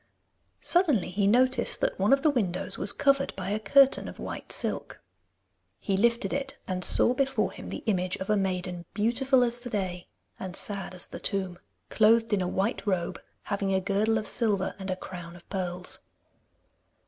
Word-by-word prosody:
Suddenly 300 - +2
he 195 +1 +1
noticed 255 +4 +3
that - - 0
one - - +2
of 275 0 +4
the 305 - +5
windows 195 -8 -2
was 200 - +3
covered 275 -1 +1
by - - -4
a 210 - 0
curtain 270 +6 +4
of - - -8
white - - -7
silk. - - -1 0.8
He 195 - -1
lifted 235 +4 +1
it, 275 -1 -3
and 185 -1 -2
saw 240 - +4
before 270 +1 0
him - - -9
the - - -6
image 185 -4 0
of 190 - -6
a 215 - +2
maiden 180 -3 -2
beautiful 250 +5 +2
as 240 0 0
the 245 0 -8
day 185 -4 -3 0.3
and 185 -1 -6
sad 195 -2 -2
as 180 - 0
the - - -9
tomb, 190 -3 -3 0.3
clothed 225 0 +4
in 200 - +2
a 180 - -1
white 200 +5 -1
robe, 180 -4 -1 0.2
having 195 -1 -1
a - - +3
girdle 205 +4 +1
of 215 - -4
silver 205 -5 0
and 190 0 -6
a 185 - 0
crown 175 -2 -9
of 175 - -15
pearls. 180 -2 -3
200 Hz, 185 wpm, -28 LUFS, 185-245 Hz, 0.8 s, the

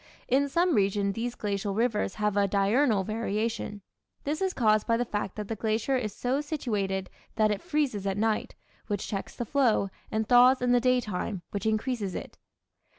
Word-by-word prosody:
In 275 +3 +2
some 345 +4 +2
regions 200 -2 +2
these 235 +2 -3
glacial 200 -1 -2
rivers 220 -4 0
have 210 -1 0
a 200 -1 +3
diurnal 205 +2 +2
variation. 215 -1 -2 0.4
This 300 +4 -2
is 380 -1 +1
caused 215 - +2
by 230 - +3
the 245 - 0
fact 205 -4 -3
that 210 -1 -5
the 225 - -3
glacier 220 +5 0
is 230 -5 -1
so 255 +7 -1
situated 205 -11 -2 0.3
that 215 -1 +3
it 205 - -2
freezes 260 -10 -1
at 195 0 -1
night, 220 0 0 0.3
which 205 -2 -2
checks 195 -2 -5
the 240 - -3
flow, 230 -6 +2 0.2
and 220 0 -1
thaws 250 +2 +6
in 250 0 +1
the 245 0 +4
daytime, 220 -6 0
which 200 +1 -2
increases 220 -3 -1
it. - - -7
220 Hz, 180 wpm, -28 LUFS, 205-250 Hz, 0.4 s, thaws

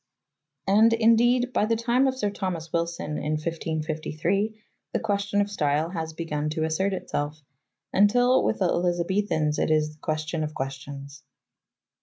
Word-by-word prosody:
And, 220 +4 +5
indeed, 240 +2 +3
by 210 - +2
the 230 - +2
time 240 +4 +2
of 260 0 -1
Sir 205 -5 0
Thomas 175 -5 -4
Wilson 170 -3 -2
in 150 +1 -2
1553 160 +5 -2 0.3
the - - +1
question 205 -1 0
of 205 0 -2
style 155 -2 0
has 160 -3 -4
begun 150 -2 -3
to 155 +1 -2
assert 160 +5 0
itself, 150 -5 -3 0.5
until 245 +6 +4
with - - +1
the 190 - +1
Elizabethans 175 -2 0
it - - +1
is 155 -1 +2
the 155 - -23
question 155 +1 -2
of 150 0 -5
questions. 140 +2 -6
170 Hz, 150 wpm, -26 LUFS, 155-205 Hz, 0.5 s, And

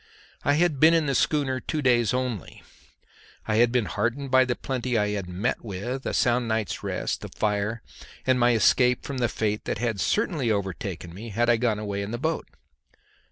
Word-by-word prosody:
I 145 - +3
had 160 -3 +2
been 160 +3 +7
in 165 -2 +2
the 140 - 0
schooner 135 -2 +1
two 150 +4 -3
days 120 -4 +3
only; 125 - -3 0.8
I 110 -1 +1
had 120 +1 +4
been 125 -3 +1
heartened 120 - -2
by 130 0 +6
the 125 -1 -1
plenty 125 -2 -2
I 105 -1 +1
had 100 -3 -3
met 95 +8 -2
with, 115 +6 -4
a - - -2
sound 120 0 +2
night's 110 -3 -2
rest, - - -3
the - - -6
fire, 105 +2 -1 0.4
and 130 -1 +3
my 120 0 +4
escape 125 +2 +3
from 140 -2 -4
the 120 -2 +1
fate 105 -1 -2
that - - -2
had 115 -4 -2
certainly 160 - 0
overtaken 95 -4 -3
me 110 +6 -8
had 120 +3 +2
I 120 - +3
gone 115 -2 +1
away 100 -1 -3
in 100 - -4
the 120 - -3
boat. 160 +5 -2
120 Hz, 200 wpm, -26 LUFS, 105-130 Hz, 0.8 s, been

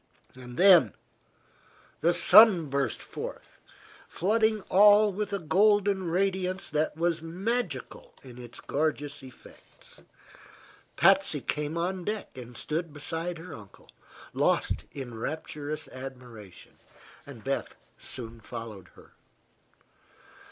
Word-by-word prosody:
Then 130 - +4 1.1
the 170 - +3
sun 190 -10 +7
burst 140 -4 -1
forth, - - -9 0.5
flooding 220 +3 +1
all 205 +2 +5
with 205 +1 -3
a 200 - 0
golden 195 +2 +2
radiance 185 0 -1
that 155 0 -1
was 170 -1 0
magical 180 - -4
in 125 -2 -12
its 120 -1 -10
gorgeous 145 -1 -2
effects. 130 -2 -15 0.9
Patsy - - +4
came 150 +2 -3
on 180 +2 -2
deck 210 -3 -5
and 125 -2 -10
stood 160 +1 -3
beside 165 +4 -4
her 165 +1 -10
uncle, 100 -3 -14 0.4
lost - - 0
in 120 -5 -7
rapturous 150 +2 -5
admiration. 125 -7 -11 0.5
Beth - - -4 0.2
soon 115 -2 -9
followed 110 -5 -9
her. - - -18
160 Hz, 100 wpm, -28 LUFS, 130-190 Hz, 1.1 s, sun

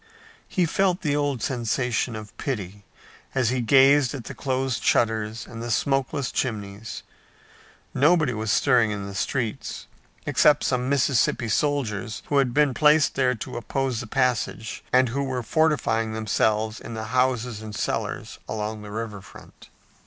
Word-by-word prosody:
He 180 -3 +1
felt 185 +2 +1
the 145 -5 0
old 145 -5 -1
sensation 120 -1 -1
of 105 -1 -9
pity 100 -6 -4 0.5
as 130 -4 +2
he 130 0 0
gazed 135 +3 +5
at 130 - -6
the - - -7
closed 130 -2 -1
shutters 110 -1 +1
and 115 -1 -9
the 120 - -5
smokeless 135 +3 0
chimneys. 105 -3 -4 0.9
Nobody 150 -2 +3
was 110 -1 -2
stirring 125 -4 +4
in 100 -1 -4
the 100 - -7
streets, 120 +4 -3 0.4
except 150 -1 +4
some 125 0 0
Mississippi 130 -4 +2
soldiers 110 -6 -1
who 145 - +2
had 135 -3 +3
been 145 +1 +3
placed 150 +1 +4
there 130 -2 +2
to - - -6
oppose 130 +1 -2
the 115 - -6
passage, 120 -3 -1
and 130 -1 +4
who 140 +4 -1
were 130 -2 -2
fortifying 115 -6 +1
themselves 110 0 0
in 115 - -7
the 110 - -4
houses 125 -3 +1
and 110 -1 -7
cellars - - -3
along 110 0 -3
the 105 - -9
river 105 -1 -5
front. - - -15
125 Hz, 155 wpm, -25 LUFS, 110-135 Hz, 0.9 s, gazed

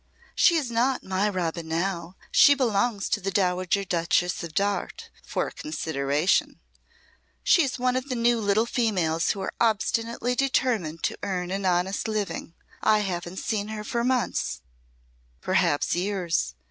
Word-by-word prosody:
"She 340 - +4
is 280 -7 -1
not 245 +3 +1
my 190 +2 0
Robin 170 -3 -3
now. 170 +1 -2 0.2
She 285 - +7
belongs 230 -4 0
to 205 - 0
the 195 - -2
Dowager 185 0 +1
Duchess 175 -1 0
of 160 -2 -8
Darte 200 +2 -1
for - - -2
a - - -16
consideration. 155 - 0 0.8
She 345 - +5
is 270 -4 -1
one 250 0 +1
of 260 +2 -2
the 255 - -1
new 235 0 +2
little 205 +2 +2
females 185 -10 0
who 200 - -1
are 190 - -3
obstinately 230 +2 +1
determined 245 - 0
to - - -1
earn 180 -3 -3
an 195 0 -1
honest 180 +3 0
living. 205 -5 -3 0.3
I 215 -1 +4
haven't 180 -2 -4
seen 210 -1 -2
her 215 -1 -5
for 235 +2 -2
months 250 0 0 0.8
perhaps 145 - +1
years. 175 - -1
200 Hz, 150 wpm, -26 LUFS, 175-235 Hz, 0.8 s, She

